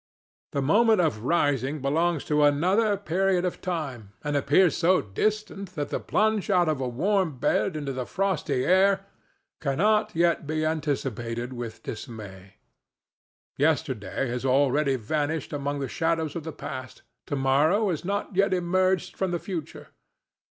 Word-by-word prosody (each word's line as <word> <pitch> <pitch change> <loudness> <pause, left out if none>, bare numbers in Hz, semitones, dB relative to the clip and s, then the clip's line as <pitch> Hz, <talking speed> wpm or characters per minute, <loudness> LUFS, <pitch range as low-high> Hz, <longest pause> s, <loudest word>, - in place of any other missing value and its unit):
The 140 - 0
moment 220 - +4
of 145 -10 0
rising 145 -2 +1
belongs 160 +3 +1
to 150 -1 +2
another 185 +9 +3
period 190 0 +1
of 180 - -3
time, 135 - -4
and 145 0 -2
appears 145 +6 +4
so 180 +2 +3
distant 200 - -2
that 145 -2 -3
the - - -2
plunge 215 -1 0
out 180 -3 +3
of 155 -4 0
a 130 - -1
warm 175 - 0
bed 170 +7 +1
into 145 -3 -3
the 130 -1 -4
frosty 155 -9 -1
air 195 +1 +3 0.5
cannot 210 +9 +1
yet 170 -2 +2
be 155 0 -1
anticipated 130 -6 -2
with 120 -2 -7
dismay. 100 -5 -8 1.0
Yesterday 135 -6 0
has 125 +1 -3
already 135 +1 +2
vanished 150 +7 -2
among 145 0 -2
the 135 - -2
shadows 160 +1 -1
of 165 -2 -5
the 160 - -4
past; 130 -3 -8 0.2
to 145 - -2
morrow 150 +10 +2
has 160 - -3
not 200 +1 -3
yet 195 0 +3
emerged 185 +1 +1
from 190 - -1
the 175 - -1
future. 170 -3 -6
155 Hz, 150 wpm, -26 LUFS, 135-185 Hz, 1.0 s, moment